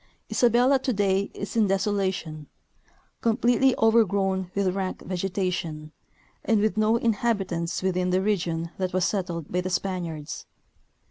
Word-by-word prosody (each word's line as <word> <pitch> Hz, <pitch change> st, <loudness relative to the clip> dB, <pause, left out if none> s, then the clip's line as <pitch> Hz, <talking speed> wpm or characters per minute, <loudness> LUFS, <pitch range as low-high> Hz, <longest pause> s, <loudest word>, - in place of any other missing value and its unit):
Isabelki 250 Hz, +3 st, +3 dB
today 200 Hz, -6 st, +1 dB
is 200 Hz, +1 st, -6 dB
in 220 Hz, -3 st, +3 dB
desolation, 190 Hz, -6 st, -1 dB, 0.7 s
completely 245 Hz, +3 st, +3 dB
over 225 Hz, +1 st, +5 dB
grown 190 Hz, -2 st, -1 dB
with 195 Hz, -2 st, +1 dB
rank 190 Hz, -1 st, -3 dB
vegetation, 180 Hz, -5 st, -3 dB, 0.5 s
and 225 Hz, -2 st, +2 dB
with 215 Hz, +1 st, +1 dB
no 215 Hz, +1 st, +3 dB
inhabitants 200 Hz, -7 st, -1 dB
within 185 Hz, -1 st, 0 dB
the 185 Hz, +1 st, +2 dB
region 170 Hz, -5 st, -1 dB
that 185 Hz, -1 st, -2 dB
was 185 Hz, -1 st, +2 dB
settled 175 Hz, -6 st, -3 dB
by 180 Hz, -, +1 dB
the 185 Hz, -, -3 dB
Spaniards. 175 Hz, -5 st, -3 dB
195 Hz, 130 wpm, -26 LUFS, 180-215 Hz, 0.7 s, over